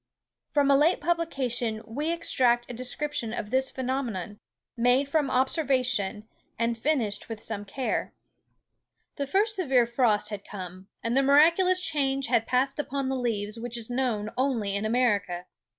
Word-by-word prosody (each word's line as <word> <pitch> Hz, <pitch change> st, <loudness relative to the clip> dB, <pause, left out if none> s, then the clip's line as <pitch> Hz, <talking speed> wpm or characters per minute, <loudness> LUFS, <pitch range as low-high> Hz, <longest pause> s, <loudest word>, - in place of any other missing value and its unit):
From 285 Hz, -2 st, +3 dB
a -, -, +6 dB
late 310 Hz, +6 st, +3 dB
publication 260 Hz, -9 st, -1 dB
we 290 Hz, +9 st, -2 dB
extract 245 Hz, -8 st, +2 dB
a -, -, -6 dB
description 255 Hz, -1 st, -2 dB
of 210 Hz, -, -5 dB
this 265 Hz, +1 st, +2 dB
phenomenon, 245 Hz, -7 st, -3 dB, 0.4 s
made 245 Hz, +4 st, +3 dB
from 290 Hz, -1 st, +1 dB
observation, 255 Hz, -, 0 dB, 0.3 s
and 230 Hz, 0 st, 0 dB
finished 230 Hz, -5 st, -1 dB
with 225 Hz, -2 st, -6 dB
some 205 Hz, -2 st, -3 dB
care. 250 Hz, +6 st, -2 dB, 1.1 s
"The 280 Hz, -, -2 dB
first 415 Hz, +7 st, +1 dB
severe 265 Hz, -9 st, +3 dB
frost 230 Hz, -3 st, +1 dB
had 205 Hz, -2 st, -6 dB
come, 185 Hz, -1 st, -8 dB, 0.2 s
and 230 Hz, +1 st, 0 dB
the 270 Hz, -, +5 dB
miraculous 335 Hz, +7 st, +5 dB
change 275 Hz, -6 st, 0 dB
had 230 Hz, -2 st, +2 dB
passed 265 Hz, +3 st, +1 dB
upon 275 Hz, -2 st, -2 dB
the 265 Hz, -, -1 dB
leaves 225 Hz, -3 st, -2 dB
which 240 Hz, 0 st, -3 dB
is 235 Hz, +1 st, -5 dB
known 235 Hz, -4 st, -1 dB
only 235 Hz, -7 st, 0 dB
in 200 Hz, +2 st, -1 dB
America. 205 Hz, -7 st, +1 dB
250 Hz, 150 wpm, -27 LUFS, 220-275 Hz, 1.1 s, a